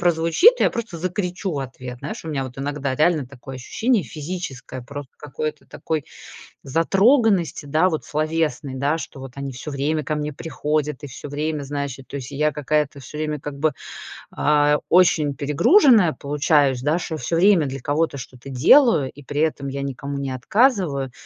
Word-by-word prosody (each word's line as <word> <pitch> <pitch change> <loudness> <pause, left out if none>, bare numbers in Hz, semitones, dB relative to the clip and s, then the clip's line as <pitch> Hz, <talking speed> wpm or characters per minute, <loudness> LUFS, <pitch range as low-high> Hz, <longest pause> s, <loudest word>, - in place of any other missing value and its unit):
прозвучит, 175 - +5
я - - +4
просто 230 -8 -5
закричу 180 +1 -3
в 145 - -2
ответ. 125 -2 -7
Знаешь, 215 -3 -6
у - - -6
меня 145 -3 -1
вот 130 0 -8
иногда 140 -1 -2
реально 155 -2 +2
такое 135 0 -10
ощущение 220 - 0
физическое 145 -3 -6
просто 140 +1 -9
какой-то 150 +1 -5
такой 155 -3 -3 0.6
затроганности, 195 - +2
да, 155 +6 +3
вот 160 -3 -3
словесной, 155 -2 -1
да, 140 +4 0
что 150 - -8
вот 135 -1 -9
они 140 0 -5
всё 125 +4 -7
время 150 +2 -1
ко 155 - -2
мне 150 0 -3
приходят 150 -1 -2
и - - -5
всё 140 +2 -9
время, 150 +1 -2
знаешь, 140 -1 -4
и, - - -10
то 135 - -10
есть, 135 -1 -6
и - - -7
я 150 +2 +2
какая-то 150 0 -1
всё 140 +3 -10
время 150 -1 -2
как 140 0 -7
бы, 155 0 +2 0.6
а, 150 0 +3
очень 165 -5 +4
перегруженная 180 - +5
получаюсь, 145 -3 +1
да, 150 +5 +1
шо 165 -2 -4
всё 155 +6 -2
время 180 -3 +5
для 135 0 -5
кого-то 145 +2 0
что-то 125 +1 -10
делаю, 145 - +5
и 145 - -14
при 145 +2 -3
этом 145 -3 -1
я 140 +1 -4
никому 140 +1 -4
не 135 -1 -3
отказываю. 155 - +1
150 Hz, 180 wpm, -22 LUFS, 135-165 Hz, 0.6 s, прозвучит